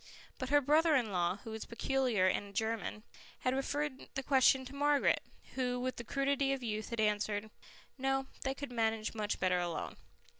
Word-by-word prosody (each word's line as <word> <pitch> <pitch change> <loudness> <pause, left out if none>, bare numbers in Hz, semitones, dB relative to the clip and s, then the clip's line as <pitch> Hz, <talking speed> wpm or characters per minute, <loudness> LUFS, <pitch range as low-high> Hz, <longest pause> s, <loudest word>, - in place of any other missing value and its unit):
But 260 -2 -3
her 290 +1 +5
brother 310 +3 +4
in 235 -6 +1
law, 175 0 +1
who 225 - -7
was 220 0 -5
peculiar 245 -4 +1
and 200 +2 0
a - - -12
German, 220 0 -2 0.4
had 255 - +1
referred 275 +1 -2
the 270 - -2
question 265 -1 +4
to 265 - -9
Margaret, 290 0 +3 0.3
who 250 -1 -1
with 255 +1 -2
the 235 - -5
crudity 275 +2 +1
of 265 -2 -4
youth 215 -2 -3
had 235 - -4
answered, 210 0 0 0.5
"No, 270 0 +1 0.2
they 265 0 -1
could 280 -2 -6
manage 225 -2 0
much 215 -1 -2
better 180 -1 +2
alone." 175 -2 -3
250 Hz, 185 wpm, -34 LUFS, 215-270 Hz, 0.5 s, her